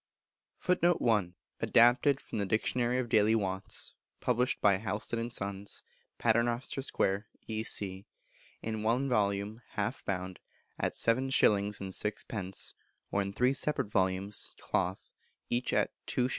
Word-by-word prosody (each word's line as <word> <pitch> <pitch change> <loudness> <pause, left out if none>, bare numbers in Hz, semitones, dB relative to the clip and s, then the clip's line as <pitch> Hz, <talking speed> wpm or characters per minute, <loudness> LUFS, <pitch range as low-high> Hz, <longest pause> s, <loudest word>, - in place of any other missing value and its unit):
[Footnote 175 -1 +2
1: 105 -7 +2 0.2
Adapted 125 +4 +5
from - - -5
the 100 - +1
"Dictionary 120 +4 +1
of 130 -1 -1
Daily 110 0 +4
Wants," 95 -3 -2 0.3
published 125 +1 +1
by 100 -2 +4
Houlston 110 +2 -2
and 115 +1 -3
Sons, 100 -2 -3 0.3
Paternoster 120 +3 +1
Square, 100 -5 0 0.2
E.C., 100 -3 0 0.6
in 110 -1 -3
one 120 +5 +1
volume, 105 -1 0
half - - -2
bound, 95 -1 -3 0.4
at - - 0
7s. 130 +4 +1
6d., 100 -1 0 0.4
or 100 - +2
in 100 0 -2
three 125 +6 +2
separate 140 -6 0
volumes, 95 +1 -1
cloth, - - -2 0.4
each 120 +1 0
2s. - - +2
110 Hz, 120 wpm, -31 LUFS, 100-120 Hz, 0.6 s, Adapted